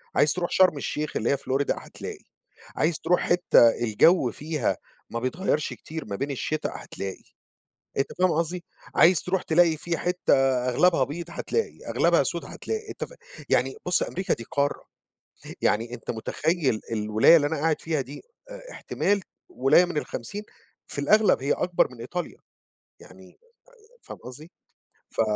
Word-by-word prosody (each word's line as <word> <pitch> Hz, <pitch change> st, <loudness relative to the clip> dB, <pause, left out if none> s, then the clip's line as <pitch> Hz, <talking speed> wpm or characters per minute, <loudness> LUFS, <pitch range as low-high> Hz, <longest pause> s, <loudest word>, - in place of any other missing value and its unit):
عايز 145 Hz, +1 st, +4 dB
ترُوح 175 Hz, -1 st, -3 dB
شرم 185 Hz, -5 st, +4 dB
الشيخ 150 Hz, +2 st, -3 dB
اللي 115 Hz, -, 0 dB
هي 140 Hz, -, +2 dB
Florida 135 Hz, +1 st, -1 dB
هتلاقي، -, -, -9 dB, 0.5 s
عايز 160 Hz, 0 st, +1 dB
ترُوح 175 Hz, +2 st, +2 dB
حِتّة 175 Hz, -9 st, +5 dB
الجو 120 Hz, -, +4 dB
فيها 150 Hz, -3 st, -2 dB, 0.3 s
ما 115 Hz, -, -3 dB
بيتغيرش 150 Hz, +4 st, -1 dB
كتير 160 Hz, 0 st, -8 dB
ما 100 Hz, -2 st, -5 dB
بين 140 Hz, +6 st, -3 dB
الشتا، 155 Hz, +3 st, -2 dB
هتلاقي، 95 Hz, -1 st, -7 dB, 0.7 s
أنت 135 Hz, -, +1 dB
فاهم 185 Hz, -1 st, +3 dB
قصدي؟ 170 Hz, +2 st, -2 dB, 0.3 s
عايز 175 Hz, -1 st, +5 dB
ترُوح 185 Hz, 0 st, -1 dB
تلاقي 165 Hz, -1 st, +3 dB
فيه 165 Hz, +2 st, -3 dB
حِتّة 180 Hz, -3 st, +1 dB, 0.3 s
أغلبها 140 Hz, +2 st, +3 dB
بيض 160 Hz, +6 st, -6 dB
هتلاقي، 455 Hz, -, -2 dB
أغلبها -, -, +3 dB
سود -, -, -3 dB
هتلاقي، 440 Hz, -1 st, -5 dB
أنت -, -, -5 dB
فاهم، -, -, -15 dB, 0.3 s
يعني -, -, +1 dB
بُص -, -, +2 dB
أمريكا 345 Hz, -, -1 dB
دي 115 Hz, -, -9 dB
قارة، 140 Hz, 0 st, -1 dB, 0.8 s
يعني 115 Hz, +3 st, +1 dB
أنت 115 Hz, -, -6 dB
متخيل 140 Hz, +2 st, -1 dB
الولاية 110 Hz, +8 st, +5 dB
اللي 145 Hz, -2 st, +3 dB
أنا 160 Hz, +2 st, -1 dB
قاعد 160 Hz, 0 st, +1 dB
فيها 160 Hz, -3 st, -1 dB
دي 135 Hz, +2 st, -8 dB, 0.3 s
أ-احتمال -, -, -2 dB, 0.3 s
ولاية 135 Hz, +7 st, +4 dB
من 175 Hz, -3 st, -5 dB
ال50 200 Hz, -, -5 dB, 0.4 s
في 140 Hz, -, -4 dB
الأغلب 210 Hz, 0 st, +4 dB
هي 140 Hz, -, +2 dB
أكبر 180 Hz, -1 st, +1 dB
من 120 Hz, -2 st, -13 dB
إيطاليا 175 Hz, +9 st, -5 dB, 0.6 s
يعني -, -, -16 dB, 0.4 s
أ 465 Hz, +3 st, -25 dB
فاهم -, -, -10 dB
قصدي؟ 145 Hz, +7 st, -11 dB, 0.6 s
ف -, -, -1 dB
155 Hz, 155 wpm, -26 LUFS, 130-180 Hz, 0.8 s, حِتّة